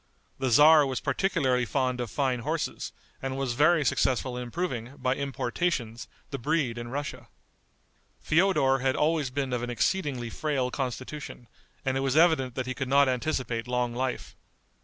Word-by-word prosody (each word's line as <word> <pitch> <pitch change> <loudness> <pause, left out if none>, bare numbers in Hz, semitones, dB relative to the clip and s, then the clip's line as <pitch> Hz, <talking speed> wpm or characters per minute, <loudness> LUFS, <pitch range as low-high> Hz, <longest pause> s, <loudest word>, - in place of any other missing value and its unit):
The 130 -1 0
tzar 150 +5 +7
was 130 -3 -2
particularly 135 -10 +1
fond 125 0 -1
of 120 - -4
fine 130 +1 0
horses, 115 - -3 0.3
and 135 0 -3
was 135 -3 -1
very 150 +3 +4
successful 130 0 +1
in 125 - -4
improving, 125 -2 -4
by 130 - 0
importations, 135 -2 -2 0.2
the 140 - -4
breed 130 -3 0
in 120 - -6
Russia. 130 -2 -5 0.9
Feodor 155 -6 +3
had 130 +1 +1
always 150 -3 +1
been 130 0 -2
of 120 - -1
an 120 - -4
exceedingly 120 - -1
frail 135 -5 -1
constitution, 130 0 -5 0.4
and 130 0 +1
it - - 0
was 135 +1 0
evident 155 -7 +4
that 130 - -2
he 130 - -3
could 130 +1 -4
not 140 +1 +5
anticipate 125 -3 -1
long 125 -1 0
life. 130 +1 -3
130 Hz, 160 wpm, -28 LUFS, 125-145 Hz, 0.9 s, tzar